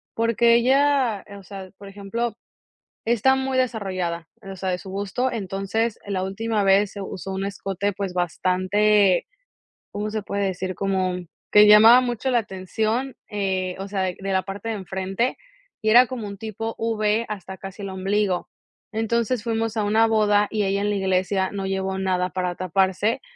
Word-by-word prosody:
porque 230 Hz, +1 st, +3 dB
ella, 260 Hz, -3 st, +2 dB
o -, -, -14 dB
sea, 190 Hz, -1 st, -9 dB
por 200 Hz, 0 st, -11 dB
ejemplo, 210 Hz, +3 st, -3 dB, 0.7 s
está 240 Hz, +3 st, +3 dB
muy 265 Hz, 0 st, -1 dB
desarrollada, 185 Hz, -9 st, -2 dB
o 195 Hz, -1 st, -8 dB
sea, 190 Hz, 0 st, -2 dB
de 180 Hz, -, -1 dB
su 190 Hz, -, -10 dB
busto, 205 Hz, +6 st, -1 dB
entonces 200 Hz, +2 st, -2 dB
la 190 Hz, -2 st, -1 dB
última 210 Hz, +2 st, -1 dB
vez 195 Hz, +1 st, +4 dB
se 200 Hz, -, -7 dB
usó 190 Hz, 0 st, -6 dB
un 190 Hz, +1 st, -2 dB
escote 200 Hz, 0 st, -3 dB
pues 195 Hz, -2 st, -4 dB
bastante, 185 Hz, +3 st, +2 dB, 0.7 s
¿cómo 210 Hz, +1 st, -3 dB
se 215 Hz, -1 st, -2 dB
puede 200 Hz, 0 st, -2 dB
decir?, 185 Hz, 0 st, -3 dB
como 190 Hz, -2 st, 0 dB, 0.4 s
que 210 Hz, 0 st, +8 dB
llamaba 220 Hz, +4 st, +9 dB
mucho 245 Hz, +1 st, -2 dB
la 240 Hz, -, +4 dB
atención, 220 Hz, +6 st, -2 dB
eh, 190 Hz, -3 st, -1 dB
o 195 Hz, -, -5 dB
sea 190 Hz, -2 st, -1 dB
q -, -, -21 dB
de 195 Hz, -, -2 dB
la 190 Hz, -, +1 dB
parte 205 Hz, +3 st, -6 dB
de 220 Hz, -, -1 dB
enfrente, 190 Hz, +4 st, -2 dB, 0.4 s
y 215 Hz, -, +1 dB
era 245 Hz, +2 st, +7 dB
como 245 Hz, -5 st, -5 dB
un 200 Hz, 0 st, -7 dB
tipo 225 Hz, +1 st, -5 dB
V 225 Hz, 0 st, 0 dB
hasta 190 Hz, -2 st, -6 dB
casi 195 Hz, +1 st, -9 dB
el 195 Hz, -, -4 dB
ombligo, 190 Hz, 0 st, -1 dB, 0.5 s
entonces 230 Hz, +1 st, 0 dB
fuimos 225 Hz, -1 st, -1 dB
a 215 Hz, -, +1 dB
una 220 Hz, +2 st, +4 dB
boda 210 Hz, -2 st, +3 dB
y 215 Hz, -2 st, 0 dB
ella 200 Hz, +1 st, 0 dB
en 205 Hz, -, 0 dB
la -, -, 0 dB
iglesia 190 Hz, 0 st, 0 dB
no 195 Hz, -1 st, -4 dB
llevó 190 Hz, 0 st, -2 dB
nada 185 Hz, -1 st, 0 dB
para 180 Hz, 0 st, -2 dB
taparse, 190 Hz, +4 st, 0 dB
200 Hz, 175 wpm, -23 LUFS, 190-225 Hz, 0.7 s, llamaba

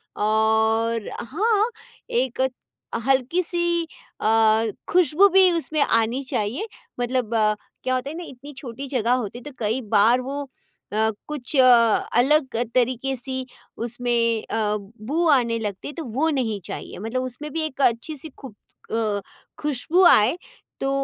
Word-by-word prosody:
और 220 Hz, +1 st, +1 dB
हाँ, 420 Hz, -, +1 dB, 0.4 s
एक 255 Hz, +1 st, 0 dB, 0.6 s
हल्की-सी 340 Hz, +6 st, +1 dB, 0.4 s
अ, -, -, +1 dB, 0.6 s
खुशबू 360 Hz, +2 st, +5 dB
भी 380 Hz, -1 st, +6 dB
उसमें 315 Hz, -3 st, -1 dB
आनी 230 Hz, +3 st, +2 dB
चाहिए 230 Hz, -, -2 dB, 0.3 s
मतलब 245 Hz, -2 st, -1 dB
अ, 215 Hz, -1 st, +3 dB, 0.3 s
क्या 255 Hz, -, 0 dB
होता 255 Hz, +2 st, -2 dB
है 310 Hz, -, -6 dB
ना 350 Hz, -, -5 dB
इतनी 275 Hz, +3 st, -11 dB
छोटी 270 Hz, 0 st, -7 dB
जगह 245 Hz, -2 st, +1 dB
होती 240 Hz, -2 st, -2 dB
है, -, -, -15 dB
तो 295 Hz, -, -8 dB
कई 225 Hz, +3 st, 0 dB
बार 225 Hz, +5 st, +5 dB
वो 275 Hz, +3 st, -4 dB, 0.5 s
अ, 220 Hz, +1 st, +2 dB, 0.2 s
कुछ 295 Hz, -1 st, -5 dB
अ, 260 Hz, -, +7 dB, 0.5 s
अलग 265 Hz, 0 st, +3 dB, 0.2 s
तरीके 255 Hz, +2 st, +1 dB
सी 260 Hz, +1 st, -4 dB, 0.3 s
उसमें 240 Hz, +1 st, -2 dB, 0.3 s
अ, 210 Hz, -2 st, 0 dB
बू 235 Hz, -, -3 dB
आने 235 Hz, -5 st, +3 dB
लगती 205 Hz, -4 st, -5 dB
है 290 Hz, -, -6 dB
तो 325 Hz, -4 st, -6 dB
वो 270 Hz, +8 st, 0 dB
नहीं 240 Hz, -8 st, -1 dB
चाहिए -, -, -7 dB
मतलब 225 Hz, +5 st, -2 dB
उसमें 255 Hz, +4 st, -6 dB
भी 325 Hz, -, -1 dB
एक 280 Hz, -2 st, -5 dB
अच्छी 240 Hz, +6 st, +1 dB
सी 300 Hz, +3 st, -9 dB
खु 265 Hz, -6 st, -10 dB, 0.4 s
अ, 215 Hz, -3 st, 0 dB, 0.4 s
खुशबू 300 Hz, +5 st, +1 dB
आए, 235 Hz, +3 st, +6 dB, 0.4 s
तो 270 Hz, -, -1 dB
255 Hz, 150 wpm, -23 LUFS, 225-295 Hz, 0.6 s, अ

